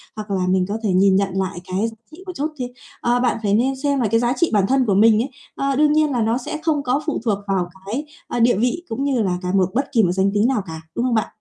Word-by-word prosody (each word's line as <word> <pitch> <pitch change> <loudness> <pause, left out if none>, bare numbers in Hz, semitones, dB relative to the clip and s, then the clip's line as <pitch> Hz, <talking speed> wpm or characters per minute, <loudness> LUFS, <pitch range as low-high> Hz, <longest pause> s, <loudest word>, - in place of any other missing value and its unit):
hoặc 210 -1 -7
là 185 -2 0
mình 185 -1 +2
có 210 - -1
thể 205 - 0
nhìn 190 +1 +4
nhận 195 0 +2
lại 190 -1 -2
cái 190 +4 -1
giá 225 - -14 0.2
trị 340 +4 -13
một 365 - -5
chút 295 -1 -1
thê 250 - -2 0.3
ơ, 240 +1 +2
bạn 245 -1 +1
phải 200 -1 +1
nên 260 +5 +2
xem 280 0 0
là 230 - +2
cái 230 +2 +2
giá 240 +1 +1
trị 340 - +2
bản 195 -2 +3
thân 265 0 +2
của 200 -4 +2
mình 220 +1 +5
ấy, 270 - -3 0.3
ờ, 275 0 0
đương 300 +1 +4
nhiên 305 -1 +3
là 240 -3 0
nó 225 +2 +1
sẽ 265 +4 -5
không 300 -3 +1
có 260 +4 0
phụ 310 - -2
thuộc 205 -3 +1
vào 185 -3 0 0.2
cái, 270 +8 -3 0.2
ơ, 240 - -3
địa 240 -1 +4
vị 250 +9 0
cũng 260 +5 -3
như 265 -5 +1
là 180 -3 0
cả 180 - -3
một 185 -2 +3
bất 270 +4 -1
kỳ 230 -5 +3
một 175 - +2
danh 190 +2 +1
tính 210 +3 +3
nào 250 -6 +1
cả, 160 0 -7
đúng 240 - 0
không 245 -2 +1
bạn? 220 - +1
230 Hz, 305 wpm, -21 LUFS, 195-270 Hz, 0.3 s, mình